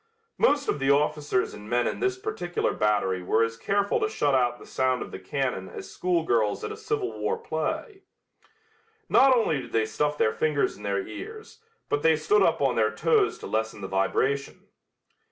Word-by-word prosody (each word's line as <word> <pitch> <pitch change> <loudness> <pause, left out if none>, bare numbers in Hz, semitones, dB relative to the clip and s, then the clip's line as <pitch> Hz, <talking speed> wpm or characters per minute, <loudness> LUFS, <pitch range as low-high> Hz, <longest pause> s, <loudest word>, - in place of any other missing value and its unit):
Most 290 - +3
of - - 0
the 135 0 +1
officers 145 -2 +1
and 105 +1 -10
men 120 0 +2
in - - -2
this 385 -1 0
particular 380 - -2
battery 100 -3 +1
were 110 +5 +2
as 115 0 -2
careful 200 - 0
to 425 0 0
shut 145 - 0
out 120 -2 +2
the - - -13
sound 130 -1 0
of - - -11
the - - -7
cannon 125 -2 -3
as - - -9
schoolgirls 160 - 0
at - - -3
a - - -5
Civil 435 -2 -3
War 465 - 0
play. 445 -2 -4 1.1
Not 265 -2 +6
only 160 - +1
did - - -12
they 110 -1 +2
stuff 150 +6 -1
their 110 - +2
fingers 150 -2 0
in - - -15
their 100 -1 -1
ears, 435 - -9 0.3
but 145 - 0
they 160 0 +4
stood 180 +7 +2
up 170 -6 +2
on 135 -3 +2
their 110 -1 +3
toes 110 - +2
to - - -10
lessen 110 -1 -2
the 95 - -4
vibration. 130 +9 -1
140 Hz, 190 wpm, -26 LUFS, -, 1.1 s, Not